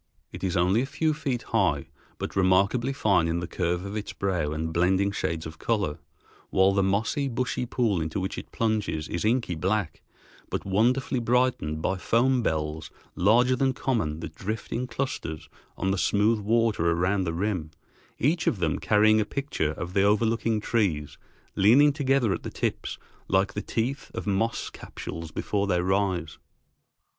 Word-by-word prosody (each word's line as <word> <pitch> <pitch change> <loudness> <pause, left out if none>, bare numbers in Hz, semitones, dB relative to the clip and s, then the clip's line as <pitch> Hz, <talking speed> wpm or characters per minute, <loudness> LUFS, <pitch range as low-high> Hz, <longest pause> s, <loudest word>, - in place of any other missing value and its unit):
It - - -9
is 95 0 0
only 90 +6 +3
a 135 - -2
few 155 +3 0
feet 130 -5 -2
high, 70 -1 0 0.3
but - - -5
remarkably 100 +7 +3
fine 100 -11 +2
in 85 +1 0
the 85 - -3
curve 85 +1 -2
of 100 +1 -5
its 105 -1 -4
brow 90 -6 -1
and 80 +1 -3
blending 95 +3 +2
shades 80 -4 -2
of 80 0 -9
color, 105 -10 -1 0.5
while 95 +1 +4
the 100 - +2
mossy, 105 +9 0
bushy 125 0 -2
pool 115 -8 +1
into 80 +5 -2
which 95 +1 -3
it - - -8
plunges 105 -9 -1
is 85 - -3
inky 115 -3 +1
black, 95 +1 -1 0.5
but - - -3
wonderfully 120 +7 +1
brightened 120 -10 +1
by 95 - 0
foam 120 +8 +2
bells 80 -5 -2 0.3
larger 120 +7 +4
than 130 +1 +1
common 85 - -1
that - - -6
drift 110 +4 -5
in 125 +2 -2
clusters 120 - -4 0.3
on 95 - 0
the 95 - 0
smooth 105 +3 +2
water 110 -4 +2
around 90 +4 +1
the 85 - -1
rim, 90 -4 -1 0.5
each 155 +7 +1
of - - +2
them 80 -5 0
carrying 110 +1 +4
a - - +2
picture 105 - -2
of 85 +2 -6
the 100 - +3
overlooking 110 +2 +2
trees 100 - -1 0.4
leaning 135 +9 +6
together 135 -7 +2
at - - -4
the - - -5
tips - - -3 0.3
like 95 +1 +2
the 105 - -3
teeth 125 +5 -2
of - - -4
moss 105 +3 -1
capsules 80 -1 -7
before 100 +4 -1
they 90 -2 +2
rise. 95 -3 0
100 Hz, 170 wpm, -26 LUFS, 85-115 Hz, 0.5 s, leaning